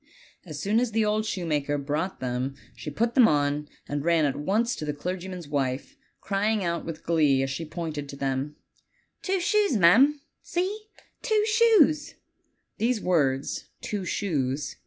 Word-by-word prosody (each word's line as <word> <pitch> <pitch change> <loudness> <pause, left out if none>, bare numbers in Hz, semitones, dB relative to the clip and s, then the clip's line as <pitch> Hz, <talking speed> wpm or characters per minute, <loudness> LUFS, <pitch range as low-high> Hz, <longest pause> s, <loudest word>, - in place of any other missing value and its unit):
As 155 -3 -6
soon 205 +8 +2
as 240 -3 -1
the 220 -1 +2
old 215 +1 0
shoemaker 150 -7 -1
brought 150 +6 -3
them 130 +2 -2 0.2
she - - -6
put 230 +10 0
them 245 -3 +7
on, 145 0 +1 0.2
and 145 0 -3
ran 165 -2 +3
at 140 - 0
once 215 - 0
to - - -5
the 150 -1 -3
clergyman's 180 +1 -5
wife, 135 -2 -2 0.3
crying 205 +1 0
out 170 -1 -1
with 165 -1 -7
glee, 150 -5 +3
as 135 - -2
she 165 +5 -4
pointed 155 -3 -5
to 140 - -7
them: 135 +1 -2 0.7
"Two 385 0 0
shoes, 405 - +2
ma'am! 240 - +6 0.2
See, 400 +5 -3 0.3
two 435 -3 +2
shoes!" 425 -10 +4 0.6
These 235 +1 +1
words, 140 -8 0
"two 205 -2 -4
shoes!" 145 -8 -2
170 Hz, 155 wpm, -26 LUFS, 145-225 Hz, 0.7 s, them